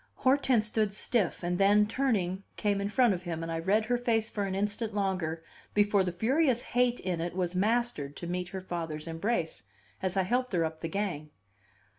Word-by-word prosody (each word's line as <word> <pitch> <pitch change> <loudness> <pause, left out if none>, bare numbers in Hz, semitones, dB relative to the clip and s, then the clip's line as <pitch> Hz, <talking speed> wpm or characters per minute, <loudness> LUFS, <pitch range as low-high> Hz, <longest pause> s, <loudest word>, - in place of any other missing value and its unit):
Hortense 260 -4 +3
stood 215 -1 0
stiff, 210 -5 0
and 175 +1 -1
then, 205 +1 +5
turning, 210 -6 0 0.2
came 200 -1 +1
in 200 - -1
front 240 0 +4
of 180 - -4
him, 165 -2 -4
and 165 - -4
I 165 - -2
read 205 +6 +2
her 245 +2 +1
face 225 -2 0
for 205 -2 -1
an 190 -1 -2
instant 210 +2 -1
longer 185 -5 -1 0.3
before 205 -1 +4
the 180 - -1
furious 250 - +2
hate 245 0 +1
in 180 -3 -2
it 175 +1 -3
was 180 -1 -1
mastered 205 -7 0
to - - -7
meet 180 +1 -3
her 190 0 -5
father's 165 -4 -4
embrace, 165 +1 -2 0.4
as 185 0 -1
I 190 - +4
helped 250 +4 0
her 170 -2 +2
up 160 0 -5
the 165 - -4
gang. 175 -6 -3
195 Hz, 200 wpm, -30 LUFS, 175-225 Hz, 0.4 s, then